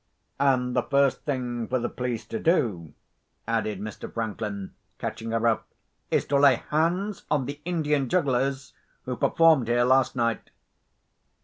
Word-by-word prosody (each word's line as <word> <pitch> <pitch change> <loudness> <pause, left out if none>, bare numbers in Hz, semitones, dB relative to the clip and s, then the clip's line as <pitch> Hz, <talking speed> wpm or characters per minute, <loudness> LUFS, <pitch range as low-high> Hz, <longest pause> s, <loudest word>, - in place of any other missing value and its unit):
"And 130 -3 +2
the 125 - +3
first 140 +1 +1
thing 125 -5 -2
for 130 - 0
the 120 -1 -1
police 120 -3 -4
to 110 - -3
do," 105 - 0 0.5
added 110 -3 -1
Mr. 105 0 -7
Franklin, 105 -3 -4 0.2
catching 115 - -5
her 115 +1 +1
up, 115 - +1 0.4
"is - - +1
to 140 - +3
lay 140 -2 +6 0.2
hands 175 +6 0
on 145 -4 +1
the 145 +2 -6
Indian 150 -6 0
jugglers 135 -5 0 0.3
who 125 - -3
performed 160 -4 +4
here 120 +1 +3
last 130 +1 +3
night." 115 -2 -1
125 Hz, 145 wpm, -26 LUFS, 115-140 Hz, 0.5 s, lay